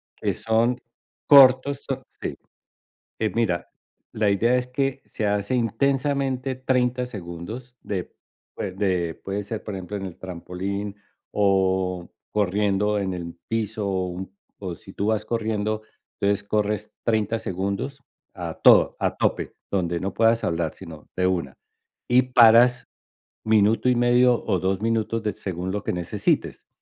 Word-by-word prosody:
que - - -1
son 115 +2 +1 0.5
cortos, 140 0 +7
son 135 -1 -3 0.2
sí, - - -4 0.8
eh, 110 -1 0
mira, 90 -7 0 0.4
la 105 -2 +1
idea 115 +5 +3
es 125 - -1
que 135 +1 -2
se 105 - -3
hace 100 +4 0
intensamente 135 +2 0
30 125 -1 +1
segundos 105 +5 -8
de 95 -3 -4 0.4
de 95 -4 -1
puede 100 +1 -3
ser, 110 +2 -5
por 105 - -5
ejemplo, 95 +2 -5
en 95 - -5
el 90 - -9
trampolín, 95 +3 -5 0.4
o, 95 -3 +1 0.2
corriendo 105 +1 +1
en 95 -2 -2
el 85 -1 -6
piso, 110 -2 -2
o, 95 -1 0
un 95 +2 -7 0.2
o 95 -3 -5
si 95 -3 -14
tú 100 - -2
vas 110 -1 +1
corriendo, 110 -2 -1 0.4
entonces 100 0 +1
corres 105 0 -1
30 110 -1 +1
segundos 100 +10 -3 0.3
a - - -5
todo, - - +6
a - - 0
tope, - - -1 0.2
donde 85 -3 0
no 95 0 -2
puedas 115 0 +3
hablar, 85 -1 -1
sino 80 -5 -11
de 90 0 +2
una. 85 -8 -1 0.5
Y 125 +1 +5
paras 125 0 +6 0.6
minuto 110 +2 +3
y 125 - +3
medio 120 0 +4
o 95 -4 +1
2 95 +2 -1
minutos 115 0 0
de 105 - 0
según 95 -1 -4
lo 105 - -2
que - - -1
necesites, 90 +4 -1
105 Hz, 145 wpm, -24 LUFS, 95-120 Hz, 0.8 s, cortos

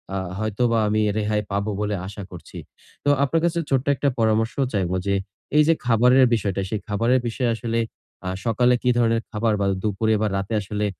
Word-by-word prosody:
আ - - 0 0.2
হয়তোবা 115 +2 +1
আমি 110 +1 +1 0.2
রেহাই 105 0 0
পাবো 100 +2 -1
বলে, 105 0 -1
আশা 100 +1 -8
করছি। 90 - -11 0.5
তো 145 - +2
আপনার 160 +4 +1
কাছে 170 0 0
ছোট্ট 135 -1 +1
একটা 140 +1 +1
পরামর্শও 110 +4 +1
চাইবো। 95 -3 0
যে 100 - +2 0.4
এই 150 - +7
যে 165 - +6
খাবারের 125 +2 +5
বিষয়টা, 100 -3 0
সেই 110 - -2
খাবারের 115 +5 +2
বিষয়ে 120 +1 -1
আসলে 115 0 -2 0.5
আ - - 0 0.2
সকালে 120 +2 +3
কি 125 - +2
ধরনের 115 -1 +2
খাবার? 110 0 0
বা - - +2 0.2
দুপুরে 110 +1 +1
বা 110 - +2
রাতে 100 +3 -3
আসলে 105 +1 -3
110 Hz, 185 wpm, -23 LUFS, 105-125 Hz, 0.5 s, এই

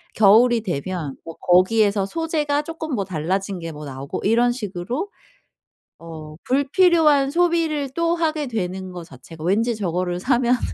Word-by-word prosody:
겨울이 225 +3 +5
되면 175 -5 -4
뭐 165 - -9
거기에서 200 +2 +3
소재가 300 +2 -1
쪼끔 320 -1 -6
뭐 200 - -2
달라진 185 +3 -2
게 165 -1 -6
뭐 150 0 -9
나오고 135 0 -6
이런 235 +3 +3
식으로 240 - -4 0.9
어 155 -2 -10
불필요한 290 0 +3
소비를 330 -4 +1
또 335 0 +1
하게 315 -3 -1
되는 190 -4 -4
거 175 -1 -8
자체가 155 +2 -13
왠지 225 +7 +1
저거를 180 -3 -2
사면은 245 +2 +2
215 Hz, 300 characters per minute, -22 LUFS, 180-285 Hz, 0.9 s, 겨울이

